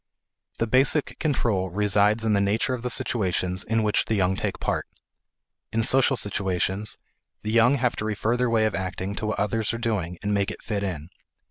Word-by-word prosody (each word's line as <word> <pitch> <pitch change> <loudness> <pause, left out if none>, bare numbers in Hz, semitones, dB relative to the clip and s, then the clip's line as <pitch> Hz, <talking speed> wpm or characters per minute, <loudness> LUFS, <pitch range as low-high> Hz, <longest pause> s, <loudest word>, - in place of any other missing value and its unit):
The 115 - +1
basic 135 +5 +2
control 115 - 0
resides 105 +3 +2
in 110 - +2
the 100 - +3
nature 105 +6 +1
of 125 - -4
the 125 - -3
situations 95 -6 0
in 115 0 0
which 105 -1 +2
the 110 - 0
young 95 -1 +1
take - - -3
part. - - -2 0.8
In 115 0 +1
social 135 +3 +4
situations 95 0 -1 0.5
the 105 - -2
young 115 +4 +5
have 125 -2 0
to 105 - -3
refer 110 +2 0
their 125 0 +1
way 110 -1 +2
of 110 - 0
acting 95 +1 -3
to 110 - -3
what 110 - -2
others 110 +2 0
are - - -3
doing 100 -8 -2
and 105 0 0
make 100 -1 +1
it - - -8
fit 105 -3 -2
in. 85 -5 -4
105 Hz, 200 wpm, -25 LUFS, 100-115 Hz, 0.8 s, young